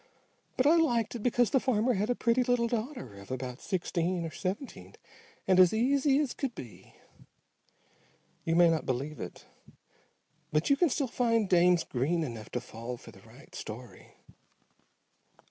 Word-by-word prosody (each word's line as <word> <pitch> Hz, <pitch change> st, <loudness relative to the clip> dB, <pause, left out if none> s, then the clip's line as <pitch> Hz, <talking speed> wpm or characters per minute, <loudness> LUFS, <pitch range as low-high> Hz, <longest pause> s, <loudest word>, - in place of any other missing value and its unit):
But 255 Hz, -, +2 dB
I 320 Hz, +4 st, +6 dB
liked 240 Hz, -9 st, +1 dB
it 240 Hz, -, -5 dB
because 245 Hz, -1 st, +2 dB
the 265 Hz, -, +4 dB
farmer 250 Hz, -1 st, +1 dB
had 210 Hz, +2 st, -1 dB
a 245 Hz, -, +2 dB
pretty 240 Hz, +2 st, +2 dB
little 245 Hz, -1 st, +2 dB
daughter 235 Hz, -, -4 dB
of 100 Hz, -, -13 dB
about 130 Hz, 0 st, -5 dB
sixteen 175 Hz, -2 st, -1 dB
or 165 Hz, -, -5 dB
seventeen 200 Hz, -, -5 dB, 0.5 s
and 185 Hz, -1 st, +4 dB
as 185 Hz, +3 st, +6 dB
easy 270 Hz, +4 st, +3 dB
as 290 Hz, -4 st, 0 dB
could 265 Hz, -4 st, -4 dB
be. 120 Hz, -4 st, -11 dB, 1.5 s
You 165 Hz, -, 0 dB
may 175 Hz, 0 st, +6 dB
not 165 Hz, -1 st, 0 dB
believe 140 Hz, +4 st, -3 dB
it, -, -, -8 dB, 1.1 s
but 155 Hz, -, +1 dB
you -, -, +7 dB
can 345 Hz, +3 st, +3 dB
still 280 Hz, +1 st, 0 dB
find 230 Hz, -3 st, +1 dB
dames 180 Hz, -1 st, +4 dB
green 155 Hz, +7 st, -1 dB
enough 115 Hz, -7 st, -6 dB
to 125 Hz, -, 0 dB
fall 120 Hz, 0 st, -7 dB
for -, -, -13 dB
the -, -, -17 dB
right -, -, -17 dB
story. -, -, -9 dB
200 Hz, 160 wpm, -30 LUFS, 160-245 Hz, 1.5 s, you